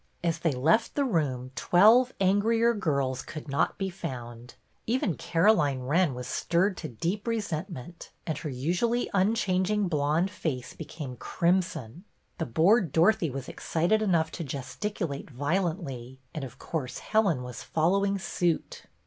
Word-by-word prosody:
As 165 -1 0
they 165 -2 +1
left 160 - +2
the 285 - +2
room 135 - -1
twelve 225 +8 +5
angrier 225 +5 +3
girls 140 - -1
could 155 -1 -8
not 140 0 0
be 190 -1 -2
found; 120 -7 -7 0.3
even 225 -6 +1
Caroline 165 -7 +2
Wren 150 +2 +2
was 125 0 -6
stirred 180 - +1
to 160 - -5
deep 175 - -3
resentment, 175 - -4 0.2
and 160 - -2
her 155 - -4
usually 175 - 0
unchanging 195 0 +2
blonde 155 +3 +1
face 140 -11 -4
became 150 -5 -7
crimson. 170 - -1 0.4
The 165 - -1
bored 170 - +3
Dorothy 165 +1 +3
was 135 0 -6
excited 175 +7 0
enough 170 -6 +2
to 170 - -5
gesticulate 145 +3 -4
violently, 145 - -2 0.2
and, 155 - -4
of 135 0 -8
course, 140 -4 -4
Helen 195 - +1
was 125 -1 -7
following 195 +5 +1
suit. 175 -3 -2
170 Hz, 140 wpm, -28 LUFS, 140-200 Hz, 0.4 s, twelve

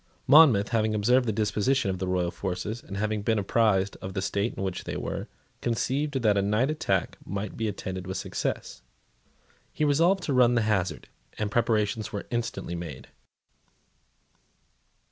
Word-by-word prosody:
Monmouth, 135 -10 +7
having 110 -1 +1
observed 120 +4 +3
the - - +2
disposition 105 +2 +1
of 95 - -4
the 95 - -2
royal 90 -1 0
forces, 100 +5 -4
and 100 - -7
having 105 0 -1
been 110 +2 +1
apprised 100 -1 +2
of 95 0 -6
the 95 - -1
state 100 +3 -1
in - - -4
which 95 -1 -3
they - - -4
were, - - -4 0.3
conceived 135 +3 -1
that 105 -2 +4
a 100 - +2
night 105 +8 +1
attack 155 - -1
might 100 +1 -5
be 110 - -2
attended 95 -2 -5
with 95 - -3
success. - - -4 0.9
He 155 - 0
resolved 170 +6 +3
to 145 - -1
run 125 -1 +5
the 115 - +2
hazard; 100 -4 -1 0.3
and 105 -1 -2
preparations 110 -2 0
were 100 - -5
instantly 120 -6 -3
made. 85 -6 -7
105 Hz, 165 wpm, -27 LUFS, 95-120 Hz, 0.9 s, Monmouth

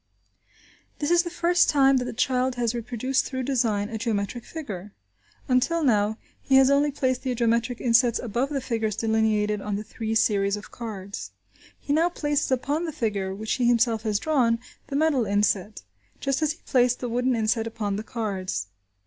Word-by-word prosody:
This 295 +2 -1
is 345 0 +5
the 345 - -5
first 345 0 +2
time 275 -2 +5
that 250 - -1
the - - -4
child 255 +1 0
has 240 -2 0
reproduced 245 +2 -1
through 260 -1 -3
design, 230 -6 0
a 220 0 -5
geometric 220 +1 -2
figure. 210 - -7 0.5
Until 275 +6 +2
now, 215 -4 +2 0.2
he 270 - +2
has 265 0 +6
only 285 +1 +3
placed 260 -3 -1
the 255 -2 -2
geometric 235 +1 0
insets 235 0 +3
above 240 +4 -2
the 280 -2 -2
figures 225 -4 -1
delineated 215 -2 +1
on 210 0 -3
the 205 - -4
three 220 0 -4
series 200 -2 +2
of 210 - -11
cards. 200 - -7 0.5
He 285 - -2
now 330 +3 +3
places 295 -4 -1
upon 285 +6 0
the 325 - -3
figure, 200 -8 -2
which 220 +2 -3
he 245 -2 +1
himself 235 -2 +3
has 215 -2 0
drawn, 245 -3 +2 0.3
the 280 - -5
metal 290 -4 +2
inset, 205 0 0 0.4
just 275 +1 -1
as 310 -1 +1
he 335 - -22
placed 250 -2 +2
the 250 - -3
wooden 245 +2 +1
inset 225 0 0
upon 210 -3 -3
the 210 - -4
cards. 190 - -3
235 Hz, 185 wpm, -25 LUFS, 215-270 Hz, 0.5 s, has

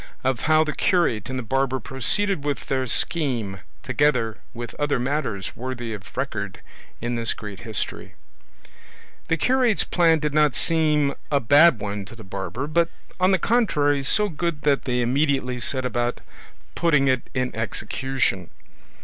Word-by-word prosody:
OF 130 -2 +1
HOW 155 +3 +4
THE 155 -1 -3
CURATE 150 - +1
AND 130 - -3
THE 125 - -3
BARBER 130 +3 0
PROCEEDED 145 - 0
WITH 145 -1 -2
THEIR 130 -1 -1
SCHEME; 120 - +1 0.2
TOGETHER 125 -7 +1
WITH 120 -1 -7
OTHER 145 -2 +1
MATTERS 125 -6 -2
WORTHY 120 -2 -5
OF 100 -3 -10
RECORD - - -3 0.4
IN 120 +1 -2
THIS 115 -2 -1
GREAT 105 -3 -8
HISTORY 110 -4 -4 1.1
The 165 - +1
curate's 250 - +2
plan 165 -2 +3
did 150 -1 -2
not 150 -3 +3
seem 150 -3 +2 0.2
a 140 - +3
bad 145 +4 +6
one 100 -1 -4
to 105 - -11
the 115 - -11
barber, 95 +6 -4
but 165 +2 +1 0.3
on 185 0 +4
the 190 - +4
contrary 155 - +2
so 210 +10 +3
good 170 -3 -3
that 145 -2 +2
they 125 -2 0
immediately 130 0 +1
set 130 +1 -1
about 120 0 -1 0.5
putting 150 -5 +2
it 130 -2 0
in 125 -2 -1
execution. 110 -3 -2
135 Hz, 155 wpm, -23 LUFS, 120-155 Hz, 1.1 s, bad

